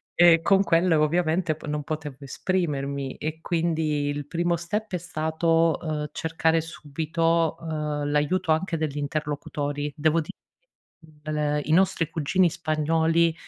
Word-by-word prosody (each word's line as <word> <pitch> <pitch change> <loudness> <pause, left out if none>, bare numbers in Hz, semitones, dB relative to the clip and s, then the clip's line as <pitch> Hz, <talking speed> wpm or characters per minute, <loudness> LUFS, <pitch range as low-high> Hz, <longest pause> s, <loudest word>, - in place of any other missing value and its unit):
e 170 -1 +6
con 195 +2 +4
quelle, 170 -1 +3
ovviamente, 160 +2 +1
po 155 - -12
non 150 0 -2
potevo 150 -2 -5
esprimermi 140 -3 -2
e 155 +1 -5
quindi 160 -4 0
il 145 0 -3
primo 170 +3 0
step 205 +6 -4
è 180 - 0
stato, 165 0 +1
uhm, 150 -2 -3
cercare 160 0 +1
subito, 165 +1 -1
uhm, 150 -2 -3
l’aiuto 160 +4 +1
anche 165 +2 0
degli 155 -2 -2
interlocutori. 145 0 -3
Devo 155 +2 +2
di 155 - -8 1.0
l 150 -1 0
i 155 - -1
nostri 180 -2 +3
cugini 170 +3 +2
spagnoli 160 +2 +1
160 Hz, 135 wpm, -25 LUFS, 150-165 Hz, 1.0 s, e